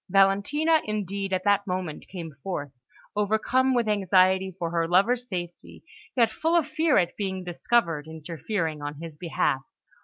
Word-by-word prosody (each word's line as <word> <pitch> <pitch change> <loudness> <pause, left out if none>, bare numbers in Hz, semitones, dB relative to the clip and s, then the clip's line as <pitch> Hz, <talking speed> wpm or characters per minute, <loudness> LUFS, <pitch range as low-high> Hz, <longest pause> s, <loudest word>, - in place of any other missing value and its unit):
Valentina, 200 - +3
indeed, 200 -2 -3
at 185 -1 0
that 200 0 +2
moment 180 -4 -4
came 170 -4 -7
forth, 145 -6 -4 0.4
overcome 220 +5 +2
with 235 -2 +1
anxiety 190 -2 +3
for 170 -3 -3
her 165 -1 +1
lover's 235 +8 +2
safety, 175 -2 -6 0.3
yet 230 -2 +4
full 325 +9 0
of 335 -4 +4
fear 305 0 +2
at 175 -3 +1
being 190 -2 -3
discovered 170 -3 0
interfering 160 +1 -4
on 145 0 -4
his 160 +1 -8
behalf. 150 -4 0
190 Hz, 150 wpm, -26 LUFS, 170-220 Hz, 0.4 s, yet